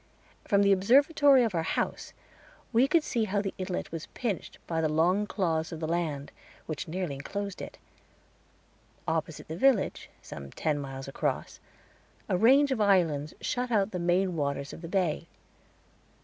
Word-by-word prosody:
From 200 0 +4
the 200 - +4
observatory 275 - +5
of 225 -4 0
our 165 - +1
house 160 - -2 0.6
we 240 +4 +5
could 320 +2 +3
see 230 -6 0
how 205 0 0
the 195 -1 -2
inlet 185 -1 -3
was 165 -1 -6
pinched 225 -7 -3
by 165 -1 -1
the 155 - +1
long 180 +7 +2
claws 165 -6 -1
of 165 - -6
the 160 - -3
land, 160 -4 -2 0.3
which 155 +3 -5
nearly 175 -2 -3
enclosed 200 +8 -5
it. - - -8 1.3
Opposite 160 -1 -2
the 160 - -5
village, 245 +2 +2
some 70 -1 -9
ten 150 -2 -1
miles 135 -1 -6
across, 135 - -3 0.7
a - - +1
range 270 +8 +5
of 245 -5 0
islands 165 -7 +2
shut 250 0 -1
out 210 -3 +2
the 180 - -3
main 175 +1 +1
waters 140 -2 -2
of - - -9
the 165 - -6
bay. 170 -3 0
180 Hz, 165 wpm, -29 LUFS, 160-210 Hz, 1.3 s, observatory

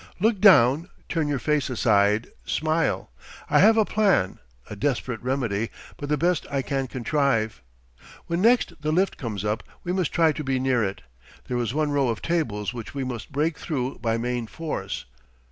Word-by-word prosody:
"Look 215 +1 +2
down, 160 - +6 0.2
turn 160 -3 0
your 145 -1 0
face 150 0 0
aside, 105 -3 +3 0.2
smile.... 160 - 0 0.4
I - - +5
have 220 +3 +6
a 220 - +4
plan, 195 - +2 0.3
a 105 - -7
desperate 125 -1 -2
remedy, 120 -5 -1 0.3
but 145 - -6
the 150 - +2
best 175 +1 +1
I 140 -1 -1
can 135 0 -2
contrive. 125 - 0 0.6
When 170 +1 -1
next 235 +3 +4
the 155 0 0
lift 185 +5 +1
comes 105 - -4
up, 105 +2 0 0.2
we 175 - -2
must 185 -5 0
try 165 -2 +4
to 150 - -5
be 135 -1 0
near 130 -3 +2
it. 95 -7 -4 0.4
There 125 - -1
is 120 +2 -2
one 155 -1 +1
row 140 -2 +2
of 115 - -3
tables 120 -12 -1
which 115 +2 -8
we 135 - -2
must 125 +1 -6
break 150 +3 0
through 135 -5 -3
by 115 -1 0
main 120 0 -2
force. 160 +5 -5
135 Hz, 180 wpm, -25 LUFS, 115-160 Hz, 0.6 s, down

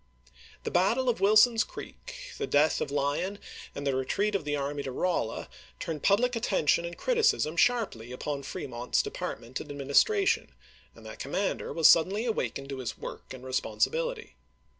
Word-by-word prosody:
The - - -3
battle 230 +9 +2
of 235 - -1
Wilson's 215 +3 +6
Creek, - - -10
the - - -1
death 150 +2 +3
of - - -1
Lyon, 145 +7 -1
Aug.io.isei. 205 - -13
and 140 - -5
the 135 -1 +1
retreat 200 +11 0
of 190 -6 -1
the 145 0 0
army 140 0 -2
to 135 - -5
RoUa 130 -6 -1 0.3
turned 160 -3 -4
public 240 +5 +3
attention 185 -7 +2
and 170 0 -6
criticism 455 - +2
sharply 170 - +1
upon 140 +2 -4
Fremont's 125 -3 -2
de - - -5
partment 120 +3 -5
and 150 - -10
administration, 145 - +2 0.4
and - - -15
that - - -9
commander - - -2
was 165 - +5
suddenly 195 +7 +4
awakened 140 - -2
to 135 -1 -5
his 125 - -4
work - - -8
and 130 -1 -9
responsi 130 0 0
bility. 485 -1 -3
165 Hz, 170 wpm, -29 LUFS, 140-225 Hz, 0.4 s, Wilson's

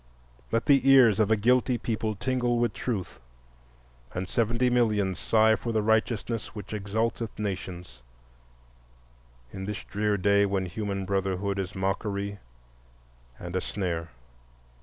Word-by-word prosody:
Let 115 0 +1
the 140 -2 +4
ears 125 -7 +7
of 110 -1 +3
a 110 - +5
guilty 125 +3 +2
people 110 -2 -2
tingle 125 +2 0
with 120 0 +1
truth, 105 -8 -4 1.0
and 90 +1 -3
seventy 115 +4 +1
millions 105 -6 +1
sigh 110 0 +4
for 115 - -4
the 110 -2 +1
righteousness 110 +1 0
which 105 0 -7
exalteth 110 +2 -2
nations, 90 - -5 1.5
in 95 - -5
this 105 0 -5
drear 105 0 -1
day 100 +1 +3
when 95 -1 -1
human 100 +1 -3
brotherhood 100 0 -1
is 95 -1 -4
mockery 100 +1 -2 1.0
and 90 +1 -7
a 95 - +1
snare. 85 -5 -3
105 Hz, 130 wpm, -27 LUFS, 95-115 Hz, 1.5 s, ears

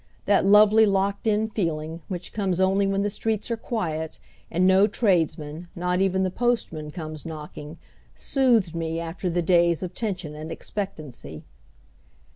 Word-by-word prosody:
That 200 -1 +3
lovely 215 +2 +7
locked 200 +2 0
in 215 0 +2
feeling, 165 -6 -3
which 180 -2 -6
comes 190 -4 -1
only 195 +1 +3
when 195 0 0
the 205 - 0
streets 220 +2 -2
are - - +2
quiet, 160 -9 -3 0.3
and 180 +2 +1
no 190 +2 +6
tradesmen, 165 -6 0
not 180 +1 0
even 190 0 +2
the 185 - 0
postman, 225 -10 -1
comes 155 -1 -6
knocking, 150 -1 -8 0.4
soothed 235 - +2
me 165 0 -2
after 170 +2 -4
the 175 0 0
days 170 0 +3
of 180 0 -5
tension 185 -8 -3
and 155 +2 -7
expectancy. 155 - -6
185 Hz, 150 wpm, -25 LUFS, 165-200 Hz, 0.4 s, lovely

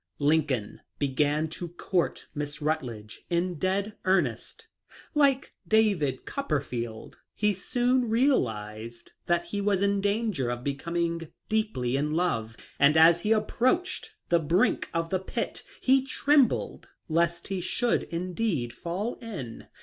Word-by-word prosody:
Lincoln 145 -7 +1 0.2
began 145 +3 +1
to 175 +2 -6
court 175 +1 -1
Miss 145 -1 -4
Rutledge 125 -9 -3
in 175 -1 0
dead 195 +4 0
earnest. 185 - 0 0.5
Like 280 -3 +3
David 195 -12 +2
Copperfield, 125 - -3 0.2
he 210 0 +2
soon 245 +5 +1
realized 115 - 0 0.2
that 175 0 +2
he 205 +2 -2
was 200 -1 +2
in 200 0 +2
danger 200 - 0
of 120 0 -3
becoming 165 +4 -2 0.2
deeply 210 - 0
in 150 +2 0
love, 115 -11 0 0.2
and 145 +3 +5
as 165 +1 +7
he 210 - 0
approached 250 +11 +1
the 170 - +4
brink 165 +5 +2
of 165 0 -2
the 185 - +2
pit 190 - -4 0.2
he 265 0 +4
trembled 275 0 +2 0.2
lest 170 +2 0
he 190 -2 -2
should 235 +6 +1
indeed 175 - -2
fall 180 - -4
in. 185 - -7
170 Hz, 125 wpm, -28 LUFS, 145-210 Hz, 0.5 s, as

